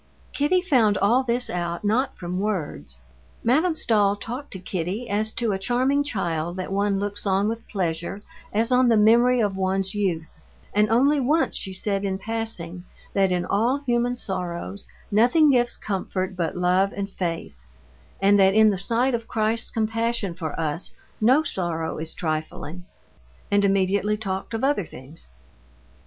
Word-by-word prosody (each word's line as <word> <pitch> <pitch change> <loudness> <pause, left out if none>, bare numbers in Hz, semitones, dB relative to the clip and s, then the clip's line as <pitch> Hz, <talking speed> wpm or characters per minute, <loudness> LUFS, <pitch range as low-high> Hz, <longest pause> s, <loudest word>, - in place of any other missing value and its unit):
Kitty 330 +6 +2
found 230 - +3
all 230 +6 +3
this 245 -1 0
out 175 0 -3
not 255 +6 +1
from 180 +1 -4
words. 170 - -3 0.4
Madame 315 +8 +3
Stahl 205 -8 +2
talked 245 +7 -6
to - - -3
Kitty 185 +6 -3
as 215 +2 0
to 230 -2 +1
a 190 - -1
charming 255 +7 +1
child 175 - -2
that 185 0 -4
one 200 0 +1
looks 205 0 -3
on 195 +1 +2
with 230 +1 -4
pleasure 180 +1 -3 0.3
as 225 +4 +1
on 250 0 +4
the 225 - +4
memory 240 +4 +5
of 205 -3 0
one's 190 +1 -1
youth, 185 -6 -1 0.5
and 210 0 +3
only 275 +6 +4
once 295 +5 +1
she 190 - -2
said 195 +1 -1
in 190 -1 -1
passing 195 -5 -4 0.3
that 195 -2 +2
in 180 -1 0
all 240 +8 +1
human 240 0 +1
sorrows 190 -2 -5 0.2
nothing 250 +9 +5
gives 245 -2 +1
comfort 190 -2 -3
but 170 -1 -2
love 180 +2 +2
and 200 0 -4
faith, 170 - -3 0.7
and 200 +1 +4
that 195 0 +5
in 220 -1 +6
the 190 - -3
sight 240 +6 +1
of 230 -1 -2
Christ's 225 0 0
compassion 225 -2 -1
for 165 -3 -5
us 160 +2 -2 0.3
no 260 +8 +5
sorrow 165 - -2
is 160 0 -5
trifling—and 155 - -4
immediately 200 +1 +2
talked 195 +1 -4
of 225 - -3
other 270 -7 +2
things. 145 0 -12
205 Hz, 160 wpm, -24 LUFS, 185-235 Hz, 0.7 s, in